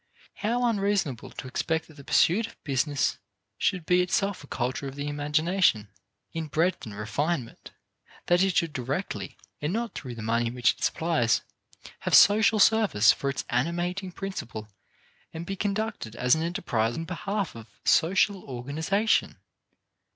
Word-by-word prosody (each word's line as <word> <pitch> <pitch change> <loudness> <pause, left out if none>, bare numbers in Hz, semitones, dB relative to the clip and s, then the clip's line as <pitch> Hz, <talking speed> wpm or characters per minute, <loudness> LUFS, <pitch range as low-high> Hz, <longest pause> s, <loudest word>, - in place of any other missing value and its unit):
How 240 +4 0
unreasonable 200 - 0
to - - -8
expect 160 +5 -1
that 155 - -16
the 140 -1 -13
pursuit 190 +11 +3
of - - -18
business 140 0 0 0.4
should 185 -5 0
be 180 +1 +4
itself 195 0 0
a - - -13
culture 130 +2 -2
of 135 - -7
the 145 0 -4
imagination, 150 - +1 0.4
in 165 -1 -3
breadth 165 0 0
and 105 - -8
refinement; 115 +6 -3 0.6
that 175 +1 +3
it 190 -2 +2
should 165 -3 +1
directly, 135 +9 -4 0.2
and 150 +2 -1
not 230 +1 -2
through 125 -3 -7
the 115 - -7
money 115 +1 +1
which 120 0 +2
it - - -10
supplies, 160 -9 +1 0.6
have - - +2
social 215 +2 +6
service 205 - +5
for 140 - -2
its 135 - -3
animating 175 +8 -1
principle 120 - -6 0.7
and 165 +1 -5
be 195 - -4
conducted 205 - -3
as 125 +1 +3
an 160 - +2
enterprise 125 - -1
in 165 - -3
behalf 195 +2 -3
of 115 -1 -11 0.2
social 190 +3 +3
organization! 155 - 0
160 Hz, 150 wpm, -27 LUFS, 130-195 Hz, 0.7 s, social